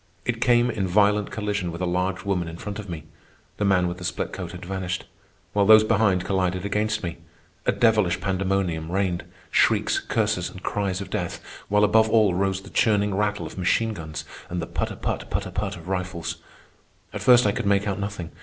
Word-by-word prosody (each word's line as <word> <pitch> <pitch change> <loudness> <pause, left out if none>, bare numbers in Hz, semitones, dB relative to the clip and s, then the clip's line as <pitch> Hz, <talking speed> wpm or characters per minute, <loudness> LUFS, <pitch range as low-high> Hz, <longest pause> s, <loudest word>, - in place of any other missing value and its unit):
I - - +4
came 120 +1 +3
in 95 -3 -1
violent 105 +2 +3
collision 100 -4 -2
with 85 - -7
a 90 - -1
large 90 +2 -1
woman 90 -4 0
in 80 0 -7
front 105 +3 -6
of 100 -2 -7
me 80 -3 -5 0.5
(the 105 - 0
man 90 -2 +3
with 90 +1 -4
the - - -8
split 90 - -3
coat - - -5
had - - -9
vanished), 95 -1 -3 0.5
while 100 -1 +3
those 110 0 +9
behind 105 -4 +2
collided 95 -1 0
against 105 +1 0
me. 85 -2 -4 0.5
A - - +5
devilish 105 -6 +3
pandemonium 95 -4 -1
reigned,—shrieks, 95 -2 +1
curses, 105 -5 0
and 95 - -12
cries 100 -2 -1
of 95 -1 -8
death, 90 -5 -3 0.3
while 105 0 +3
above 110 +1 +4
all 110 -4 +4
rose 95 +1 0
the - - -13
churning 105 -2 +2
rattle 105 +1 0
of - - -8
machine 110 +5 +1
guns 80 -4 -6 0.2
and 90 - -3
the 85 - -2
put - - -2
a - - -7
put, - - -3
put - - -1
a - - -7
put - - -2
of 85 +1 -12
rifles. 90 -2 -3 0.8
At - - -5
first 125 -2 +6
I 105 - +4
could 100 - -3
make 100 +1 +2
out 100 -1 -1
nothing. 100 -4 -4
95 Hz, 205 wpm, -24 LUFS, 90-105 Hz, 0.8 s, those